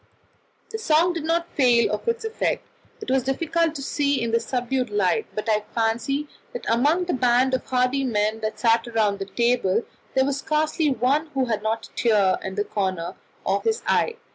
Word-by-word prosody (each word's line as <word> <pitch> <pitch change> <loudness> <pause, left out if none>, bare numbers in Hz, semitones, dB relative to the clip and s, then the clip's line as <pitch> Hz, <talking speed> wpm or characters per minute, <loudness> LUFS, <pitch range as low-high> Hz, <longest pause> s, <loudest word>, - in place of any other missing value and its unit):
The 445 - -4
song 340 -2 +3
did 330 -3 -4
not 335 +1 0
fail 245 -4 +4
of 210 - -4
its 465 0 -1
effect; 445 0 -1 0.4
it - - -4
was 265 0 +3
difficult 325 +5 0
to 275 - -5
see 285 0 0
in 235 -1 -1
the 230 - +3
subdued 250 0 -2
light, 205 +1 +1
but 215 - -4
I 215 -1 +2
fancy 240 +6 0 0.3
that 485 - -6
among 290 +10 +3
the 350 - -1
band 255 +1 +3
of 260 - 0
hardy 255 +2 +1
men 215 -3 0
that 215 0 -4
sat 230 0 +3
round 205 -3 +2
the 195 - -3
table 235 -1 +1 0.3
there 265 0 +4
was 280 0 -1
scarcely 305 +1 0
one 275 +4 +1
who 265 -1 +2
had 220 -4 -1
not 220 +1 -2
a - - -17
tear 205 -5 +2
in 190 0 -5
the 205 - 0
corner 185 -5 -2 0.3
of - - 0
his 450 0 0
eye. 465 - +1
250 Hz, 195 wpm, -24 LUFS, 220-295 Hz, 0.4 s, fail